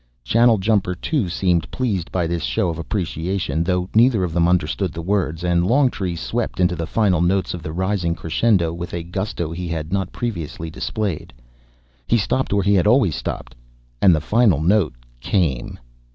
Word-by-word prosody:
Channeljumper 110 - +2
too 135 - -1
seemed 85 -2 0
pleased 100 -10 -2
by 90 -2 0
this 85 0 -2
show 90 - 0
of 85 -1 -4
appreciation, 85 -2 -2
though 90 0 0
neither 115 -3 +4
of 85 -3 -2
them 85 0 +3
understood 90 +1 0
the 85 - -5
words, 90 -3 -1
and 85 -1 +2
Longtree 120 -8 +1
swept 110 +5 -3
into 90 -1 +2
the 80 -1 -4
final 95 -6 +2
notes 95 +2 +1
of 90 - -6
the 80 - -6
rising 90 -1 -1
crescendo 85 0 +1
with 85 0 -6
a 85 - -3
gusto 85 -2 -4
he 90 +1 -5
had 80 0 -4
not 95 -1 -1
previously 85 -8 -5
displayed. 100 -1 -3 0.8
He - - +3
stopped 130 +5 -1
where 100 -1 +2
he 100 +2 +3
had 95 0 +3
always 115 - +4
stopped - - -5 0.5
and 90 -4 +6
the 75 - -1
final 105 - +3
note 85 -2 +2 0.2
came! 70 - -1
90 Hz, 175 wpm, -21 LUFS, 85-105 Hz, 0.8 s, and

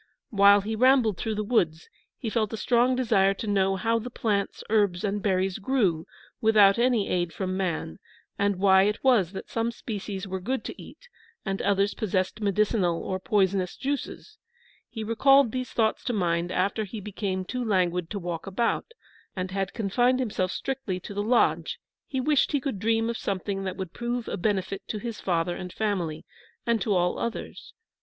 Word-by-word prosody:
While 200 -1 +6
he 220 +3 -3
rambled 245 -5 +4
through 220 -1 -2
the 215 - -1
woods, 175 -8 0 0.3
he 225 - -4
felt 215 -3 0
a - - -3
strong 245 +3 +2
desire 200 -6 +3
to 220 - -6
know 195 -2 +2
how 225 +4 +1
the 240 +3 -6
plants, 205 -4 -2
herbs, 205 -5 +2
and 205 0 -1
berries 190 0 0
grew 195 -9 0 0.3
without 215 -2 +5
any 240 -4 +2
aid 175 -2 0
from 185 +2 -3
man, 170 - -3 0.4
and 200 0 +1
why 190 0 +5
it 210 +2 0
was 230 -10 +4
that 190 - -8
some 230 0 0
species 205 -4 -5
were 190 0 -3
good 255 +8 -2
to - - -7
eat - - -14 0.4
and 195 -1 -2
others 200 0 +2
possessed 190 0 -1
medicinal 200 -3 +1
or 185 - -3
poisonous 190 -2 +1
juices. 285 +10 -4 0.5
He 220 - -5
recalled 270 +3 +4
these 255 +1 -3
thoughts 220 -2 0
to 245 - -1
mind 175 -3 0
after 200 +4 0
he 210 +2 -7
became 195 -2 -3
too 250 +6 -3
languid 180 -5 +1
to 205 - -4
walk 175 -1 -5
about, 230 - -1 0.4
and 185 -1 -3
had 195 0 -2
confined 245 +4 +1
himself 205 -7 -1
strictly 265 -9 -3
to 195 - -8
the 205 - -1
lodge; 235 +3 +2 0.3
he 265 - -2
wished 290 +2 +2
he 285 - +3
could 265 -7 -4
dream 225 +2 +1
of 235 - -2
something 195 0 -3
that 185 - -4
would 190 -3 -5
prove 240 0 -3
a - - -2
benefit 195 0 -1
to 215 - -3
his 225 +1 -6
father 175 -1 0
and 180 -1 -7
family, 185 -8 -2 0.4
and 230 -2 +1
to 210 - -1
all 180 0 +1
others. 235 - -5
205 Hz, 185 wpm, -26 LUFS, 190-230 Hz, 0.5 s, While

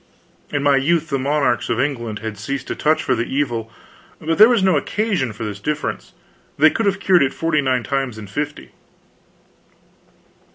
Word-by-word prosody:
In 145 -1 -1
my 140 -1 +4
youth 160 +3 +1
the 135 -2 -1
monarchs 140 -4 0
of 115 - 0
England 120 -6 -2
had 110 -1 -4
ceased 135 +6 -4
to - - -2
touch 155 +1 +1
for 130 - +1
the 115 -1 -1
evil, 120 -5 -2 0.5
but 165 +3 -2
there 215 +2 +9
was 235 -6 +2
no 190 -3 +4
occasion 190 - -1
for 110 +2 -7
this 105 -2 -5
diffidence: 150 +7 -4 0.4
they 155 +2 +6
could 225 - -1
have 195 -1 +1
cured 185 -3 +4
it 135 0 +1
forty 165 -2 +1
nine 130 -3 0
times 135 -4 -2
in 110 - -8
fifty. 150 +9 -5
140 Hz, 180 wpm, -20 LUFS, 120-155 Hz, 0.5 s, there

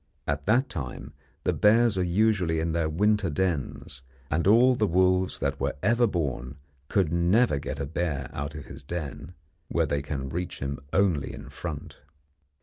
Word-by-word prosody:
At 70 +2 -2
that 125 +6 +4
time 65 -1 -6 0.3
the - - +1
bears 115 +1 +4
are 95 - 0
usually 90 -3 +2
in 80 +1 -1
their 80 -1 0
winter 105 +3 +2
dens, 80 -6 -2 0.3
and 80 +4 +1
all 120 +5 +6
the 110 -4 +1
wolves 95 +1 +2
that - - -2
were - - -1
ever 120 +3 +4
born 70 - -3 0.3
could 90 -4 +1
never 85 - +3
get - - -5
a 70 - -1
bear 75 -3 -2
out 70 +2 -4
of 75 - -7
his 70 0 -9
den, 75 +1 -6 0.3
where - - +1
they 70 - -1
can 70 -2 -4
reach 90 +4 -4
him 70 +1 -4
only 90 -8 +2
in - - -9
front. 75 -2 -7
85 Hz, 170 wpm, -27 LUFS, 70-100 Hz, 0.3 s, all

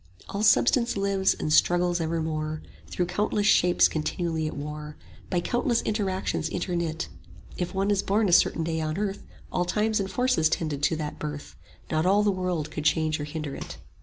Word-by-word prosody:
All 200 - -3
substance 235 +2 +4
lives 195 -1 +2
and 155 - -1
struggles 175 +1 +3
evermore 155 -1 -2 0.2
Through 180 - -1
countless 205 +3 0
shapes 180 -3 +5
continually 160 0 -2
at 155 - -6
war, 150 +1 -6 0.3
By 175 -2 +1
countless 240 +4 0
interactions 190 -6 -1
interknit: 170 -2 -2 0.5
If 180 +1 -4
one 195 +2 +1
is 200 -1 +2
born 210 +2 +1
a - - +1
certain 165 - +4
day 160 0 -2
on 155 +1 -2
earth, 200 -1 -1
70 - - -19 0.2
All 180 - 0
times 215 +3 +1
and 195 -1 -2
forces 250 -7 +2
tended 155 -3 -2
to 160 - +2
that 150 -1 -5
birth, 150 -1 -6 0.4
Not 155 +3 +1
all 200 +2 +4
the 205 - +3
world 180 -5 -2
could 150 - -4
change 155 0 +1
or 145 - -3
hinder 150 -1 -5
it. - - -7
175 Hz, 185 wpm, -26 LUFS, 155-200 Hz, 0.5 s, shapes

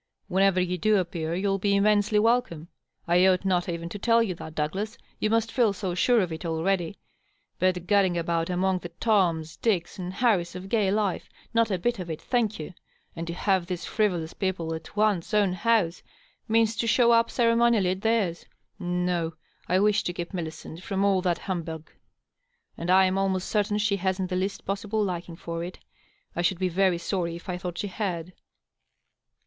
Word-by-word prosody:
Whenever 190 0 +3
you 180 0 -1
do 215 +4 +3
appear 170 -3 -2
you'll 195 +1 0
be 200 +1 +2
immensely 210 +1 +3
welcome; 210 -8 +1 0.4
I 175 +2 +5
ought 185 0 +2
not 180 -2 +1
even 170 0 -4
to 205 - -7
tell 230 +2 +4
you 195 -5 -2
that, 160 -2 -9
Douglas; 190 +9 -2 0.2
you 215 - +1
must 225 0 +1
feel 235 -6 +3
so 190 -2 -3
sure 235 +6 +3
of 180 -3 -2
it 160 - -7
already. 170 +2 -1 0.6
But 180 -1 +1
gadding 190 -2 +3
about 165 0 -1
among 185 +1 +1
the 175 - -7
Toms, 170 -8 +1
Dicks 190 -4 -1
and 180 0 -4
Harrys 190 -5 +1
of 185 +1 -7
gay 210 -3 +2
life 205 -2 -1
— - - -28
^not 230 -1 +3
a 190 - 0
bit 235 +5 -1
of 180 -2 -5
it, 160 -1 -4
thank 225 -4 0
you 155 - -6
I - - -14 0.4
And 165 0 -4
to 170 - -3
have 190 -2 +1
these 180 -2 -4
frivolous 180 -7 0
people 180 -4 -2
at 160 +3 -8
one's 210 -3 +1
own 200 -3 +3
house 195 -4 +1 0.5
means 225 0 +3
to 230 - 0
show 235 +1 +4
up 230 0 +4
ceremonially 230 -5 +3
at 190 +1 -4
theirs. 215 -7 0 0.3
No, 175 -2 -1 0.3
I 180 - +2
wish 210 +2 +3
to 175 - -1
keep 175 +2 -6
Millicent 165 -1 -6
from 195 +1 -1
all 195 -2 +3
that 175 -2 +1
humbug. 165 -4 -5 0.8
And 170 - -5
I 190 +1 +6
am 185 +1 +1
almost 190 -1 0
certain 210 -1 +1
she 210 -1 +1
hasn't 190 0 -1
the - - 0
least 190 +2 -2
possible 205 +2 -1
liking 175 -3 -4
for 165 0 -5
it. 180 +2 -7 0.6
I 175 - 0
should 175 +1 +1
be 185 0 0
very 185 0 +2
sorry 170 -1 -2
if 170 - -11
I 180 -1 -3
thought 180 -1 -5
she - - -2
had." 180 -4 -4
185 Hz, 195 wpm, -26 LUFS, 175-210 Hz, 0.8 s, I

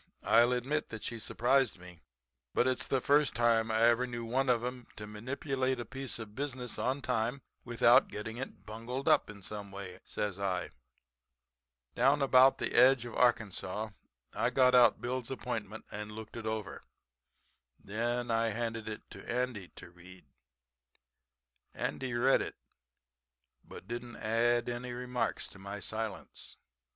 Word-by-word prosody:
'I'll 120 +2 +5
admit 135 +5 -1
that 110 -1 -7
she 115 - -4
surprised 125 +1 +2
me. 90 -2 -13 0.5
But 125 - +3
it's 130 -1 0
the 135 - +1
first 145 +2 +3
time 115 -1 +3
I 110 +1 +2
ever 120 +2 +4
knew 120 -1 -5
one 130 +3 +1
of 120 -1 +3
'em 125 -1 -5
to 105 - -7
manipulate 130 +4 -2
a 120 - -4
piece 135 +2 -3
of 110 -3 -8
business 130 -2 -4
on 135 +2 -1
time 125 +2 -1 0.2
without 120 0 +5
getting 110 +2 -6
it 135 - -7
bungled 115 +5 -5
up - - +4
in 100 -2 -10
some 105 0 -5
way,' 95 -2 -8
says 100 -2 -3
I. 95 -2 -1 1.2
"Down 140 +4 +3
about 130 0 +6
the - - -2
edge 130 -1 +6
of 120 - -7
Arkansas 110 -3 +1 0.4
I 120 - +1
got 125 0 +4
out 125 -1 +6
Bill's 125 0 -3
appointment 115 -5 -5
and 105 0 -6
looked 110 0 -9
it 115 -2 -5
over, 110 -2 -4 1.0
and - - -26
then 120 +3 -1
I 115 0 +2
handed 115 0 -3
it 110 - -7
to - - -8
Andy 120 -6 -2
to 90 - -11
read. 90 0 -15 1.5
Andy 130 -2 -3
read 130 +3 +4
it, - - -5 1.1
but - - -12
didn't 120 +1 -6
add 120 +2 +1
any 120 0 -4
remarks 125 0 -2
to 95 - -14
my 100 +1 -6
silence. 110 +1 -5
120 Hz, 155 wpm, -32 LUFS, 110-125 Hz, 1.5 s, about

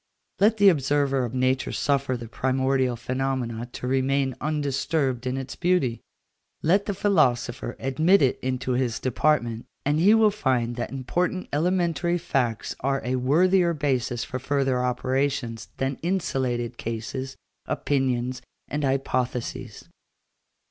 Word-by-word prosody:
Let 210 +3 +4
the 205 -1 +7
observer 140 -4 +1
of 120 +1 -6
nature 130 +1 +1
suffer 140 -2 0
the 120 -1 -8
primordial 130 +1 0
phenomenon 125 -1 -3
to - - -6
remain 135 +1 +1
undisturbed 140 -3 -1
in 130 +1 -1
its 135 0 -5
beauty; 175 -10 +1 0.6
let 195 +6 +3
the 200 - -1
philosopher 125 -11 +1
admit 155 +8 +3
it 130 - +2
into 130 0 -2
his 125 -2 0
department, 120 -3 0 0.2
and 145 +2 +2
he 200 +6 +6
will 220 -1 +5
find 125 - 0
that 120 - -3
important 175 +8 -2
elementary 175 +1 +1
facts 130 -9 -1
are 135 +1 -1
a 130 +1 0
worthier 170 +7 +3
basis 130 -5 -1
for 130 - -5
further 135 -2 0
operations 130 -1 -1
than 135 0 -2
insulated 130 -10 -1
cases, 115 +4 -5 0.3
opinions, 130 -2 -1 0.3
and 150 +1 -3
hypotheses. 130 -2 -2
135 Hz, 130 wpm, -25 LUFS, 125-150 Hz, 0.6 s, the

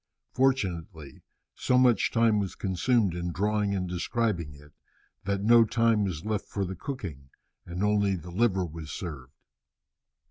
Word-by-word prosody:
Fortunately 95 - -1 0.3
so 125 - +1
much 125 -2 +4
time 115 -2 +3
was 100 -2 -3
consumed 100 +1 +1
in 85 0 -3
drawing 105 +2 0
and 90 -1 -2
describing 90 -3 -2
it 75 +1 -17 0.5
that 100 0 -1
no 115 +2 +7
time 115 -1 +2
was 90 -2 -4
left 110 -2 -2
for 100 -1 -2
the 95 +1 -5
cooking, 85 - -7 0.4
and 90 +3 -3
only 100 -2 +2
the 90 0 -9
liver 95 -1 +1
was 80 -1 -8
served. 70 -7 -7
95 Hz, 145 wpm, -28 LUFS, 85-110 Hz, 0.5 s, no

